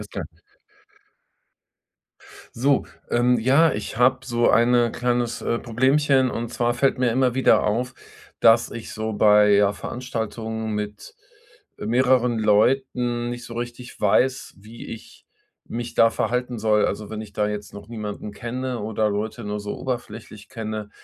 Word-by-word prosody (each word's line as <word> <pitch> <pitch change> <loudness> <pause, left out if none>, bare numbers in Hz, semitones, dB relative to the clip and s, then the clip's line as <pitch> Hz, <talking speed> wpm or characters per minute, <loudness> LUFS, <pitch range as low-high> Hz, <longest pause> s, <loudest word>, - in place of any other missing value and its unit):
Alles 105 - -10
klar. - - -5 2.3
So, 135 +3 +2 0.2
ähm. 120 0 +3
Ja, 140 +8 +4
ich - - -5
habe 130 +2 +3
so 120 -2 +2
eine 120 0 +4
kleines, 120 -1 -1
äh, 115 - -1
Problemchen, 130 +3 +2
und 120 -1 -4
zwar 120 0 0
fällt 135 +1 +1
mir 125 -1 +3
immer 125 0 +2
wieder 130 +1 +4
auf, 125 +5 -1 0.5
dass 115 +1 +5
ich 115 - -7
so 110 0 -3
bei 105 0 +5
ja 100 0 +4
Veranstaltungen 110 +1 -5
mit 105 -1 -6 0.6
mehreren 125 0 +2
Leuten 120 +2 +1
nicht 120 0 -6
so 115 - -9
richtig 120 +1 -7
weiß, 125 +6 +1
wie 110 +4 -12
ich 115 - -11 0.4
mich 120 0 -5
da 115 - +6
verhalten 125 +1 -2
soll. 105 -1 +2
Also 105 +1 -4
wenn 110 0 -5
ich 105 -2 -10
da 105 +1 0
jetzt 105 0 -5
noch 100 0 -10
niemanden 105 -2 -6
kenne 125 +2 -4
oder 110 0 0
Leute 110 +3 -3
nur 105 0 -3
so 105 0 -5
oberflächlich 110 -4 -6
kenne, 110 -2 -5
115 Hz, 150 wpm, -23 LUFS, 105-125 Hz, 2.3 s, da